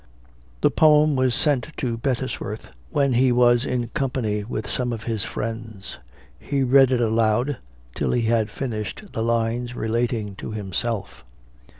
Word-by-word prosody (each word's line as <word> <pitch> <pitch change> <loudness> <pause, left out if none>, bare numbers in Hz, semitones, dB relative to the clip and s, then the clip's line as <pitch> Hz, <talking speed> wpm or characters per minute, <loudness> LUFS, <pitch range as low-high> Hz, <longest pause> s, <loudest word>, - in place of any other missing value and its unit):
The - - +4
poem 150 -1 +5
was 130 -2 +2
sent 150 0 +1
to 120 -3 -1
Bettesworth, 115 -3 -3 0.2
when 140 -4 +1
he 125 +1 +4
was 120 +1 +4
in 120 -2 -2
company 115 -6 -1
with 110 -1 -4
some 125 +3 -1
of 115 -1 -5
his 110 -4 -2
friends. 110 -2 -6 0.4
He 140 -1 -1
read 135 0 +6
it 125 -2 +1
aloud, 115 +4 +1 0.4
till - - -1
he 120 - +1
had 115 -1 +1
finished 115 - -5
the 110 - -2
lines 115 +1 0
relating 110 -3 -1
to 110 - -6
himself. 100 - -3
120 Hz, 150 wpm, -23 LUFS, 110-130 Hz, 0.4 s, read